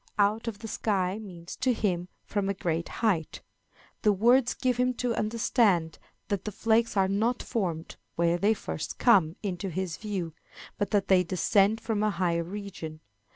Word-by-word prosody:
Out 215 +3 +2
of 225 -3 -3
the 225 - -8
sky 200 -3 -1
means, 175 -5 -9
to 255 -1 +2
him, 180 -6 -1 0.2
from 200 -1 -1
a 200 - -1
great 170 -2 -2 0.2
height. 170 -8 0 0.6
The 210 - +4
words 240 +5 +4
give 250 -2 0
him 250 0 +1
to 245 -1 -1
understand 215 -7 +1 0.3
that 200 -2 -2
the 215 - -4
flakes 225 +1 +1
are 190 -1 +4
not 220 +5 0
formed 175 -7 -3 0.2
where 170 +1 +2
they 210 +4 +3
first 155 - -5
come 185 -9 +4
into 195 -1 -3
his 180 -1 -3
view, 190 -7 -4 0.5
but 205 -2 0
that 200 -2 +1
they 185 -1 +5
descend 195 +4 +2
from 225 -2 -1
a 215 - +3
higher 175 -3 0
region. 175 -4 -7
200 Hz, 170 wpm, -28 LUFS, 180-220 Hz, 0.6 s, they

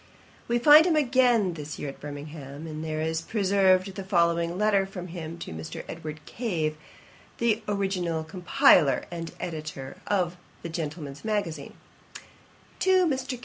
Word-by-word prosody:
] - - -27
We 235 - +2
find 300 +6 +8
him 335 - +3
again 245 - +3
this 150 -1 -7
year 145 - -4
at 135 - -10
Birmingham, 145 0 -8
and 155 -1 -6
there 155 -1 -3
is 160 0 -1
preserved 195 -1 +2
the 195 - -6
following 170 -2 +1
letter 200 -2 +2
from 185 -2 -7
him 165 -1 -6
to - - -7
Mr. 80 0 -7
Edward 155 -2 -7
Cave, 170 -10 -2 0.6
the 230 -1 +1
original 190 -5 -1
compiler 160 -5 +4
and 165 -1 -5
editor 155 -6 -6
of 180 -3 0 0.3
the 170 - -4
Gentleman's 150 -3 -5
Magazine: 170 -10 -3 1.0
TO 375 -1 +4
MR. 265 -4 -2
175 Hz, 145 wpm, -27 LUFS, 155-205 Hz, 1.0 s, find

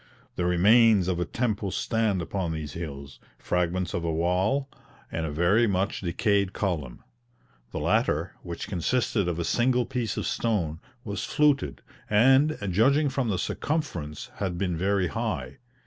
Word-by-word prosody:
The 90 - -1
remains 100 +2 +5
of 90 -2 0
a 90 - 0
temple 105 -1 -1
stand 105 -2 0
upon 90 -1 -2
these 75 -3 -5
hills, 70 -5 -7 0.2
fragments 90 +1 -1
of 85 - -2
a 85 - 0
wall, 90 - +1 0.4
and 80 -1 -2
a - - -4
very 90 +10 +3
much 95 0 -1
decayed 100 +2 +1
column. 75 - -3 0.7
The - - -5
latter, - - +1
which - - -6
consisted 100 +2 0
of 85 -2 -1
a 85 - -1
single 125 +5 +2
piece 115 -5 -3
of - - -2
stone, 85 -9 -1 0.2
was 105 -3 -4
fluted, 145 +4 +1 0.3
and, 135 +8 +4
judging 140 - +3
from 135 -3 -1
the 95 - 0
circumference, 90 - -3
had 95 -4 -2
been 90 -2 -1
very 95 +1 +1
high. 65 -2 -3
95 Hz, 150 wpm, -27 LUFS, 85-115 Hz, 0.7 s, remains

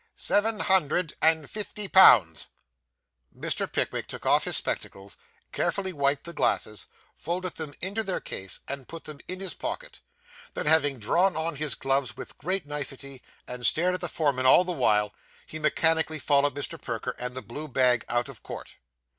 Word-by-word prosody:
'Seven 215 +1 +1
hundred 175 -2 +2
and 160 -2 +3
fifty 210 +1 -4
pounds.' 105 - +6 0.9
Mr. - - -2
Pickwick - - -1
took - - -7
off - - +3
his - - 0
spectacles, 95 0 -5 0.4
carefully 190 -2 -1
wiped 140 -2 0
the 170 - -6
glasses, 110 -9 0 0.3
folded 180 +2 -3
them 150 -3 -4
into 200 +5 -1
their 190 -3 -1
case, 95 0 -5
and 135 -2 -6
put 165 -1 -9
them 150 -2 -9
in 185 0 -4
his 190 -1 -3
pocket; - - -6 0.5
then, - - -3
having 150 -3 +4
drawn 175 - +2
on 160 0 -2
his 150 0 0
gloves 135 -2 -1
with - - -9
great 185 +4 -1
nicety, 140 -2 -4 0.3
and 125 0 -7
stared 175 +8 +3
at 180 - -3
the 175 - -2
foreman 140 -6 0
all 155 - +7
the 180 - -4
while, 105 - +2 0.3
he 155 - -7
mechanically 160 +1 +2
followed 140 -1 +2
Mr. 145 - -4
Perker 120 +1 -4
and 125 0 -4
the 130 - -5
blue 135 +9 -7
bag 125 -3 +2
out 120 +1 0
of 135 -5 -11
court. - - -9
150 Hz, 170 wpm, -27 LUFS, 130-175 Hz, 0.9 s, all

